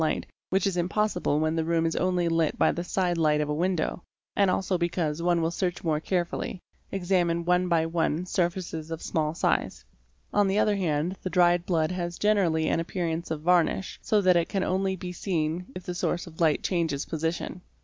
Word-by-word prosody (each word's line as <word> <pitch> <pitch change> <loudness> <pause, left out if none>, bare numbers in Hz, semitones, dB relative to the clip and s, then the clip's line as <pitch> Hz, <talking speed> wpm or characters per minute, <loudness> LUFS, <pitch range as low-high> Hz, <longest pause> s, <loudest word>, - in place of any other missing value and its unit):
light 160 - 0 0.2
which 190 0 +1
is 195 -2 0
impossible 180 -3 +1
when 155 +1 +1
the 165 - +1
room 165 0 +1
is 165 - 0
only 180 -1 +1
lit 165 -2 +1
by - - +4
the 170 - -3
side 180 -1 0
light 150 -2 +3
of 150 -1 -1
a - - +1
window, 180 +2 -1 0.3
and 200 -2 +4
also 185 +1 0
because 170 -3 -1
one 170 -1 +2
will 165 - +1
search 175 0 -2
more 155 -3 +1
carefully, 175 +2 -2 0.3
examining 175 -3 +1
one 180 +1 +2
by 165 -2 +2
one 165 0 0
surfaces 175 -3 -2
of 165 -1 -4
small 155 -1 -1
size. - - 0 0.5
On 205 -1 +4
the 195 +1 +1
other 210 -1 +3
hand 170 -1 0
the 185 - -3
dried 175 -1 +3
blood 165 -2 +1
has 175 -1 -3
generally 180 -7 +2
an - - +1
appearance 170 -1 -3
of 160 -2 -3
varnish 180 +2 +1
so 215 - +2
_ - - -7
that 185 -1 +5
it 170 -1 +2
can 195 -2 0
only 190 +1 0
be 180 0 -6
seen 175 -1 -2
if 185 - -6
the 180 - -4
source 175 0 -1
of 165 -1 -10
light 155 -3 +3
changes 165 -6 0
position. 165 +2 -3
175 Hz, 205 wpm, -27 LUFS, 160-185 Hz, 0.5 s, that